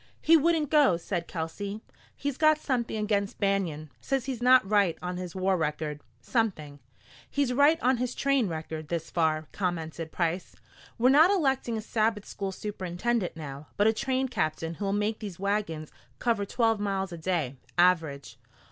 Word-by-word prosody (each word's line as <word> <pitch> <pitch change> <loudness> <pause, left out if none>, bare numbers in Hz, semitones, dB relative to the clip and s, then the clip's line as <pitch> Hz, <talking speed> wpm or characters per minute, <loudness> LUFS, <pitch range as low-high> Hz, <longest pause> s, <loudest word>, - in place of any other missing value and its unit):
"He 330 - +5
wouldn't 320 -1 +2
go," 290 - +5
said 170 0 -3
Kelsey. 200 +5 -4 0.4
"He's 285 -2 -3
got 310 +1 +4
something 245 -7 -2
against 205 -1 -1
Banion; 180 -7 -1
says 270 -3 -1
he's 260 -3 -4
not 250 -4 +6
right 200 -5 +3
on 180 0 -4
his 180 -1 -6
war 190 0 +1
record 150 -2 -2 0.2
something 155 - -2 0.3
" - - -23
"He's 280 -3 0
right 290 +5 +5
on 255 +1 +3
his 250 +1 -2
train 275 -5 +2
record 160 -2 -5
this 165 0 -4
far," 160 -2 +1
commented 165 -3 -3
Price. 175 +1 -2 0.4
"We're 250 +2 +4
not 305 +6 +7
electing 270 - +1
a - - -3
Sabbath 215 -1 0
school 195 -1 -4
superintendent 190 +1 -2
now, 145 -1 -8
but 205 - +3
a 220 - +5
train 265 +2 0
captain 160 -7 -2
who'll 195 +3 -2
make 210 +2 0
these 200 -5 -7
wagons 195 -6 -2 0.3
cover 225 -4 0
twelve 225 -2 +1
miles 195 -2 -1
a 170 - -6
day, 160 -6 -1 0.2
average. 160 -8 +2
200 Hz, 165 wpm, -28 LUFS, 165-245 Hz, 0.4 s, not